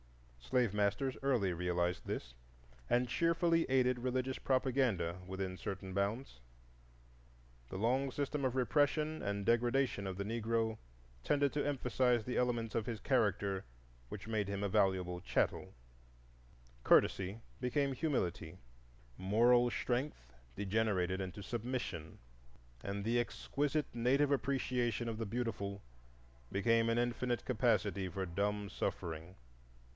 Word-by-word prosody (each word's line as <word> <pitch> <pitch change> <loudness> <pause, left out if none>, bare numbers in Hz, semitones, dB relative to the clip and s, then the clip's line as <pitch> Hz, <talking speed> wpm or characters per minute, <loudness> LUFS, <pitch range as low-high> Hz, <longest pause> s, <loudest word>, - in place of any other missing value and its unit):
Slave 105 - +1
masters 105 +6 +1
early 120 -9 +2
realized 90 0 -1
this, - - -4 0.6
and 125 +1 +3
cheerfully 165 +4 +2
aided 125 -1 +3
religious 130 +1 -1
propaganda 125 -10 +1
within 95 0 -4
certain 95 0 -5
bounds. 100 - -2 1.3
The - - -5
long 130 +6 +1
system 145 +1 -2
of 130 -1 0
repression 150 +4 +2
and 100 0 -2
degradation 120 -2 +2
of 95 -1 -4
the 100 - -3
Negro 115 0 -1 0.4
tended 140 - +2
to 145 - 0
emphasize 125 -4 +1
the 125 - -3
elements 120 -2 0
of 115 0 0
his 115 -3 -3
character 100 -6 +1 0.5
which 105 0 -7
made 105 -3 -1
him 100 0 -2
a - - +2
valuable 90 -2 +1
chattel: - - 0 1.1
courtesy 95 +3 +3 0.2
became 135 +2 +1
humility, 95 - -2 0.6
moral 120 +5 +4
strength 120 - -2 0.2
degenerated 95 -2 0
into 95 +2 -6
submission, 115 -8 -4 0.7
and 100 0 -3
the 120 +2 +2
exquisite 145 +4 -1
native 135 +5 +2
appreciation 125 -4 0
of 115 -1 -3
the 115 - -2
beautiful 100 -3 -3 0.7
became 115 +3 +3
an 115 - +2
infinite 120 -1 0
capacity 95 -2 +1
for 95 +2 -3
dumb 100 +3 -1
suffering. 85 -1 -4
115 Hz, 120 wpm, -35 LUFS, 95-130 Hz, 1.3 s, moral